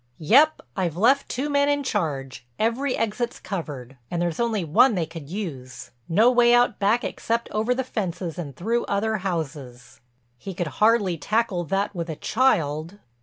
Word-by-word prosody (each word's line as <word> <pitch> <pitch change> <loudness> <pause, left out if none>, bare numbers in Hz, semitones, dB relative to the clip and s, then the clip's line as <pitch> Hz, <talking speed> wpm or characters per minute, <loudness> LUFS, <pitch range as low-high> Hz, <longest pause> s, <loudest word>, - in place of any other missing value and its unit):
"Yep—I've 190 - +2
left 260 +8 +3
two 265 +4 -2
men 285 0 +2
in 285 0 +1
charge—every 165 - -2
exit's 225 +2 -2
covered. 145 - -6
And 175 - -2
there's 170 -2 -1
only 225 -5 0
one 205 - +4
they 170 -3 0
could 160 -3 -10
use—no 165 - -1
way 240 -1 +5
out 240 -3 +2
back 210 +4 +2
except 230 +1 -2
over 220 +4 0
the 260 - -1
fences 185 -8 -4
and 140 -6 -6
through 230 - -1
other 215 +2 0
houses." 150 - -5 0.4
"He 195 -2 -7
could 175 - -2 0.2
hardly 210 -6 +3
tackle 205 -1 0
that 195 +5 -1
with 170 -2 -4
a 160 - -3
child." 170 - 0
195 Hz, 155 wpm, -24 LUFS, 160-235 Hz, 0.4 s, way